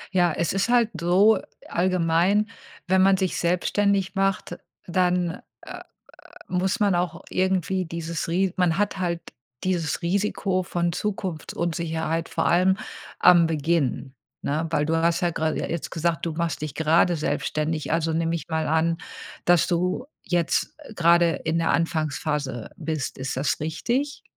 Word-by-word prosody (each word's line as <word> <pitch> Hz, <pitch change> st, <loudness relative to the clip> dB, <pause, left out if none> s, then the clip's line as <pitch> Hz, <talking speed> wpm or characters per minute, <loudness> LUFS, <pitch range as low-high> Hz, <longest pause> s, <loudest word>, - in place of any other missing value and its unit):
Ja, 175 Hz, -2 st, +4 dB
es 170 Hz, +2 st, -1 dB
ist 195 Hz, +4 st, 0 dB
halt 240 Hz, -2 st, +3 dB
so 195 Hz, +5 st, +5 dB, 0.3 s
allgemein, 180 Hz, +3 st, +2 dB, 0.4 s
wenn 190 Hz, 0 st, +4 dB
man 195 Hz, 0 st, +5 dB
sich 190 Hz, -2 st, -1 dB
selbstständig 190 Hz, +2 st, +1 dB
macht, 195 Hz, -3 st, -1 dB, 0.3 s
dann, 180 Hz, 0 st, 0 dB, 0.2 s
äh, -, -, -11 dB
äh, -, -, -7 dB, 0.7 s
muss 185 Hz, +5 st, 0 dB
man 205 Hz, -3 st, +3 dB
auch 175 Hz, 0 st, -2 dB
irgendwie 185 Hz, 0 st, 0 dB
dieses 165 Hz, 0 st, -4 dB
Ri 185 Hz, +2 st, +1 dB
man 180 Hz, -1 st, +2 dB
hat 205 Hz, -2 st, 0 dB
halt 170 Hz, -2 st, -1 dB, 0.4 s
dieses 175 Hz, -4 st, -1 dB
Risiko 190 Hz, +1 st, 0 dB
von 175 Hz, -1 st, -1 dB
Zukunftsunsicherheit, 165 Hz, -4 st, -2 dB
vor -, -, -1 dB
allem 185 Hz, +2 st, +4 dB, 0.4 s
am 170 Hz, -2 st, +6 dB
Beginn, 145 Hz, -4 st, -1 dB, 0.3 s
ne? 155 Hz, +3 st, -1 dB
Weil 150 Hz, -2 st, +1 dB
du 160 Hz, -, 0 dB
hast 170 Hz, +2 st, +1 dB
ja 175 Hz, -, +2 dB
gerade 160 Hz, -1 st, -1 dB
je -, -, -2 dB
jetzt 170 Hz, -1 st, -4 dB
gesagt: 165 Hz, 0 st, -1 dB
„Du 170 Hz, -, -1 dB
machst 170 Hz, -2 st, -2 dB
dich 150 Hz, -, -4 dB
gerade 165 Hz, +2 st, +3 dB
selbstständig“. 155 Hz, 0 st, -2 dB
Also, 165 Hz, 0 st, +1 dB
nehme 165 Hz, +1 st, 0 dB
ich 155 Hz, -, -7 dB
mal 160 Hz, -1 st, -1 dB
an, 165 Hz, +1 st, +1 dB, 0.5 s
dass 175 Hz, -2 st, +4 dB
du 180 Hz, +8 st, -1 dB, 0.2 s
jetzt, 175 Hz, -, 0 dB
äh, 225 Hz, -, -11 dB
gerade 170 Hz, -1 st, +4 dB
in 160 Hz, +1 st, -2 dB
der 165 Hz, -, +1 dB
Anfangsphase 150 Hz, -5 st, -1 dB
bist. 155 Hz, -4 st, -4 dB
Ist 130 Hz, 0 st, -3 dB
das 135 Hz, +3 st, 0 dB
richtig? 240 Hz, -, -2 dB
170 Hz, 155 wpm, -24 LUFS, 160-185 Hz, 0.7 s, am